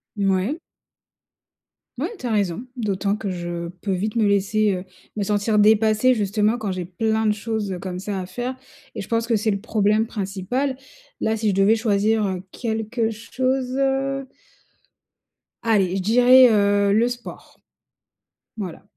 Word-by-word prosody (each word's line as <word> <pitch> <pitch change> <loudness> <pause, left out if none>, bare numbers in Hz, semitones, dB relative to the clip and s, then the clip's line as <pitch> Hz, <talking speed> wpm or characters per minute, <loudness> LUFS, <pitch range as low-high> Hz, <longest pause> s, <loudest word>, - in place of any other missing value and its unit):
Mouais. 200 - 0 1.4
Ouais, 300 +8 -2
tu - - -9
as 235 - -1
raison, 200 -1 0
d'autant 205 -2 -1
que 205 - -4
je 175 -1 -4
peux 200 - -2
vite 205 +4 -2
me 225 -2 +3
laisser, 205 +1 +2
heu, 185 0 -3 0.3
me 205 - 0
sentir 210 +1 +1
dépassée 220 +3 +4
justement 210 +1 +1
quand 215 -4 -3
j'ai 185 -1 -4
plein 220 +5 -1
de 210 - +3
choses, 215 -1 -3
heu, 180 - -5
comme 180 0 -5
ça 200 0 -4
à - - -5
faire 245 +7 -4 0.4
et - - -4
je 195 - -8
pense 230 0 0
que 235 - +2
c'est 215 +1 +1
le 200 - -1
problème 215 0 +1
principal. 215 +7 -2 0.4
Là, 220 - 0
si 220 -1 0
je - - +1
devais 195 +3 +4
choisir, 215 -1 +1
heu, 185 -1 -3
quelque 225 0 -2
chose, 255 +3 -2
heu 275 0 0 1.4
allez, 200 -5 +2
je - - -1
dirais, 250 +5 +7
heu, 200 -1 +3
le 230 +3 +3
sport. 245 0 -8 1.0
Voilà. 185 -6 -6
215 Hz, 160 wpm, -22 LUFS, 195-230 Hz, 1.4 s, dirais